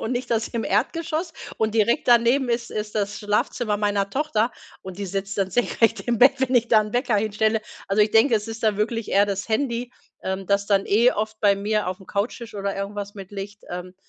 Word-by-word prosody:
und 230 - -2
nicht 245 0 -3
das 225 -1 +1
im 230 -1 -3
Erdgeschoss. 320 - -1 0.2
Und 220 0 -1
direkt 225 +2 +2
daneben 240 +2 +4
ist 235 0 -1
ist 210 0 -4
das 205 0 -2
Schlafzimmer 210 +1 -1
meiner 205 -1 0
Tochter, 265 -4 0 0.3
und 190 0 -9
die 200 - -3
sitzt 195 +1 -4
dann 190 -1 0
senkrecht 230 +2 +1
im 240 -2 -1
Bett, 265 +3 +7
wenn 260 0 0
ich 240 -1 +3
da 220 - +6
'n 210 0 -5
Wecker 245 -2 +1
hinstelle. 215 +1 +1 0.3
Also, 200 +2 +4
ich 210 - +1
denke, 225 +2 +5
es 210 +1 -4
ist 225 0 -7
da 215 -2 +2
wirklich 225 +2 -2
eher 200 +1 +5
das 200 +2 -3
Handy, 240 +1 -1 0.3
ähm, 190 0 -3
das 200 0 +1
dann 200 -1 +2
eh 235 +5 +4
oft 215 +1 -4
bei 200 -2 +4
mir 210 0 -1
aufm 185 +1 -6
Couchtisch 225 +2 -3
oder 200 -1 -3
irgendwas 200 +1 -5
mit 195 -2 -10
liegt, 205 +1 -7
ähm, 180 +1 -6
215 Hz, 215 wpm, -23 LUFS, 200-235 Hz, 0.3 s, Bett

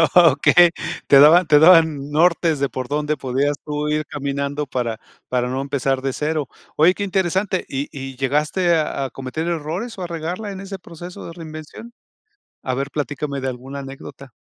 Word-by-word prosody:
Okey. 170 +1 +6 0.4
Te 140 - +7
daban 160 +5 +7
te 150 -1 +6
daban 160 -4 +5
nortes 165 -1 +2
de 140 - 0
por 130 -1 -5
dónde 150 +1 -1
podías 140 +3 -1
tú 150 0 -3
ir 155 0 0
caminando 140 0 -3
para 120 -4 -3 0.3
para 125 -1 0
no 130 +1 -2
empezar 135 -1 -1
de 135 -1 -2
cero. 150 -2 -2 0.3
Oye, 165 +4 +5
qué 205 - -4
interesante. 190 0 0
¿Y 135 +1 -3
y 135 -1 -7
llegaste 150 +6 +1
a 155 -3 -1
a - - -4
cometer 135 +5 -5
errores 170 +8 -3
o 185 - -5
a - - -4
regarla 175 +5 -4
en 190 - -7
ese 195 0 -7
proceso 175 +1 -10
de 170 - -8
reinvención? 160 +7 -10 0.7
A 130 - -2
ver, 140 +2 -2
platícame 145 -1 -3
de 135 - -2
alguna 130 +3 -7
anécdota. 135 -1 -10
150 Hz, 180 wpm, -21 LUFS, 135-170 Hz, 0.7 s, Te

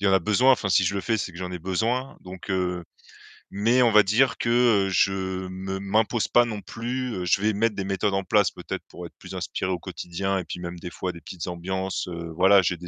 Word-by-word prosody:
il 100 - -4
y - - +5
a 95 - +4
en - - +6
besoin. 115 +8 +4
Enfin, 105 -5 0
si 95 0 +4
je 100 - 0
le 100 - -1
fais, 115 +2 0
c'est 95 -3 -4
que 85 - -11
j'en 90 -1 -4
ai 90 - -4
besoin, 115 +9 -1
donc 95 +2 -9
heu, 90 -2 -1 0.7
mais 115 +6 +3
on 120 -2 +5
va 105 -1 +7
dire 120 +6 +2
que, 120 - -1 0.4
heu, - - -2
je 95 +2 +3 0.4
me 95 +1 -5
m'impose 110 +3 +1
pas 120 0 +5
non 105 -3 -5
plus 120 +5 -4
heu, 90 - -3
je 95 +3 +2
vais 110 0 +2
mettre 110 +1 +1
des 95 - -2
méthodes 95 +1 0
en 95 0 0
place 105 +1 +3
peut-être - - -6
pour - - -9
être - - -12
plus - - -9
inspiré 95 - -3
au 90 - -1
quotidien 95 +4 -3
et 90 - -5
puis 85 - -6
même 85 0 -6
des 90 - -6
fois 90 +1 -3
des 85 - -12
petites 90 -1 -7
ambiances 95 +2 -3
heu, 85 -2 -6
voilà, 95 +2 +6
j'ai 85 0 0
des 90 +1 -10
95 Hz, 260 wpm, -25 LUFS, 90-110 Hz, 0.7 s, va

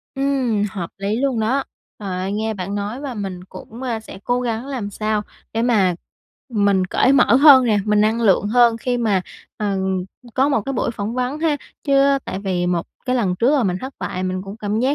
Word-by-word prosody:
Ừm, 270 -6 0
hợp 180 -4 -5
lý 200 +2 -1
luôn 260 -2 0
đó. 260 +5 +1 0.3
Trời 205 - -6
ơi, 190 +2 -2
nghe 220 +1 -1
bạn 195 0 -4
nói 205 +5 -3
và 280 -3 -5
mình 190 -4 -5
cũng, 225 +5 -11
a, 235 -4 -2
sẽ 215 - -11
cố 245 0 +1
gắng 235 0 -2
làm 250 -7 -4
sao 215 +1 -1 0.3
để 225 - 0
mà 205 -7 +3 0.5
mình 200 -5 +2
cởi 255 - +3
mở 250 -5 +5
hơn 275 -2 +8
nè, 215 -3 +2
mình 210 0 +2
năng 220 +2 +2
lượng 205 -3 +3
hơn, 235 0 +4
khi 245 +1 -1
mà, 210 -6 +1 0.4
ừm, 190 -3 -1 0.3
có 265 +2 +3
một 275 -6 +2
cái 275 - -3
buổi 235 - -1
phỏng 220 0 -4
vấn 255 +3 -2
ha. 315 -2 +1 0.3
Chứ, 275 -2 +4
a, 275 0 +4
tại - - -4
vì 185 -3 -1
một 175 -1 -1 0.2
cái 255 0 +1
lần 195 -7 +1
trước 235 +7 +3
là 270 - +2
mình 180 -2 0
thất 260 +1 -7
bại, 185 - -4
mình 185 0 -2
cũng 195 +2 -8
cảm 210 0 -2
giác 265 +3 +2
220 Hz, 225 wpm, -20 LUFS, 200-255 Hz, 0.5 s, hơn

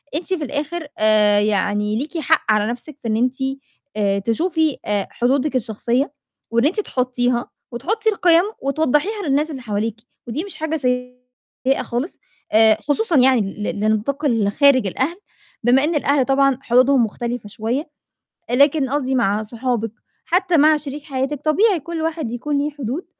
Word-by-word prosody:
أنتِ 335 - -1
في 320 -5 -2
الآخِر 295 +3 -4
آآ، 210 -1 +4
يعني 210 0 0
ليكِ 300 +6 -4
حق 310 -5 +2
على 210 0 +2
نَفْسِك 270 +4 -9
في - - -3
إن 215 - +1
أنتِ 250 +2 +1 0.6
آآ، 200 -1 +1
تشوفي 315 - 0
آآ، 205 -2 -1
حدودِك 265 +3 0
الشخصية 245 +4 -1 0.4
وإن 235 +3 +2
أنتِ 380 +8 +1
تحطّيها 250 -4 -1 0.2
وتحطّي 430 - -1
القيم 350 -4 +4 0.2
وتوضّحيها 315 - 0
للناس 295 +3 +1
اللي 265 -3 -7
حواليكِ، 220 0 -3 0.3
ودي 290 +9 -3
مش 395 - -7
حاجة 315 0 -2
سيئة 250 0 -3
خالص 245 +8 -4 0.3
آآ، 220 0 +5
خصوصًا 325 +2 +1
يعني 255 -2 +5
ل 205 +1 -4
لنطاق 220 +8 0
ال 220 -6 +2
خارج 265 -4 +4
الأهل 280 - -2 0.5
بما 255 +4 +4
إن 320 +1 0
الأهل 280 -2 +2
طبعًا 275 -1 +3
حدودهم 255 +1 +4
مختلفة 235 0 -5
شوية، 245 - -3 0.6
لكن 280 +1 +3
قصدي 265 -2 -1
مع 215 -2 +1
صحابِك، 230 -1 -2 0.3
حتّى 360 -1 +2
مع 305 +1 +5
شريك 290 0 -7
حياتِك، 275 0 -3
طبيعي 370 +4 +3
كل 330 +2 -5
واحد 320 -7 -2
يكون 285 +4 -2
ليه 290 +1 0
حدود 285 +3 -5
265 Hz, 155 wpm, -20 LUFS, 230-300 Hz, 0.6 s, آآ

